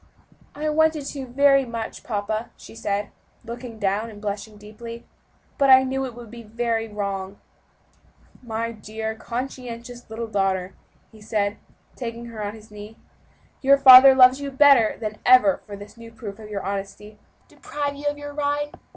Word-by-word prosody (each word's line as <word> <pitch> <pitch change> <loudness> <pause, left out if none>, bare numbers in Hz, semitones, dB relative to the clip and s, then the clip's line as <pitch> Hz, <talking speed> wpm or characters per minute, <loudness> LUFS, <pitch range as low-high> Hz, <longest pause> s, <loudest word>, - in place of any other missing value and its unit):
"I 300 +2 -3
wanted 315 -1 +2
to 270 -3 -7
very 275 +2 +4
much, 230 -3 -6
papa," 215 +1 -3
she - - -13
said, 205 -2 -3 0.3
looking 235 0 -8
down 205 +2 -1
and 210 -2 -12
blushing 210 +1 -5
deeply, 230 +3 -10 0.5
"but 275 -1 +4
I 260 0 +8
knew 265 +1 -2
it 250 -3 -8
would 235 -3 -11
be 235 0 -10
very 225 0 -2
wrong." 200 -2 -5 1.0
"My 230 -1 -4
dear, 220 0 -6
conscientious 240 0 -7
little 225 +1 -5
daughter," 195 -3 -1 0.4
he 220 - -17
said, 210 -1 -1 0.4
taking 235 -1 -6
her 215 -1 -5
on 205 +1 -5
his 215 -1 -16
knee, 210 +1 -11 0.6
"your 275 +1 +5
father 265 0 +10
loves 255 +1 +6
you 280 - -4
better 270 -5 +5
than 215 -2 -5
ever 255 +3 +5
for 205 - -7
this 205 +1 -12
new 230 0 -12
proof 215 -2 -9
of 215 -1 -11
your 200 -2 -4
honesty 195 +1 -5
and 210 - -21
truthfulness. - - -28
Deprive 285 -1 -2
you 285 +1 -10
of 290 0 -1
your 290 0 -8
ride? 290 0 -1
230 Hz, 170 wpm, -23 LUFS, 210-260 Hz, 1.0 s, father